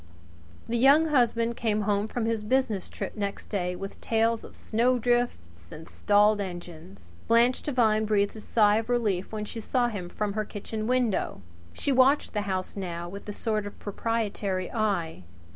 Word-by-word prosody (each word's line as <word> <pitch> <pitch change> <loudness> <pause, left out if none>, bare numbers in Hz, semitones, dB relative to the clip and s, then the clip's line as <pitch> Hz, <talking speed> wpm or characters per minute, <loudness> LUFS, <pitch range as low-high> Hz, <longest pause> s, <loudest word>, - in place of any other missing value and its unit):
The 235 0 -1
Young 290 +5 +6
Husband 235 -4 +2
came 215 -2 0
home 205 0 0
from 225 0 -2
his 225 -1 -1
business 215 -4 0
trip - - -6
next 200 -1 -4
day 180 -3 -1
with 195 +2 -8
tales 225 0 +1
of - - -12
snowdrifts 235 - 0
and 160 +1 -10
stalled 205 0 +3
engines. 160 - -9
Blanche 235 +2 +4
Devine 220 -6 +2
breathed 205 -1 +1
a - - -7
sigh 210 -1 +3
of 225 +1 -3
relief 210 -7 0
when 215 -1 -4
she 225 - -6
saw 240 +2 +1
him 190 -6 -5
from 205 +2 -2
her 215 +1 -1
kitchen 215 +1 -5
window. 245 - 0 0.3
She 285 - -1
watched 265 +2 +4
the 210 - 0
house 185 -1 -3
now 175 -3 -5
with 200 +3 -9
a - - -2
sort 215 -1 -2
of 205 - -10
proprietary 205 -3 -2
eye. 195 - -1
215 Hz, 170 wpm, -27 LUFS, 195-235 Hz, 0.3 s, Young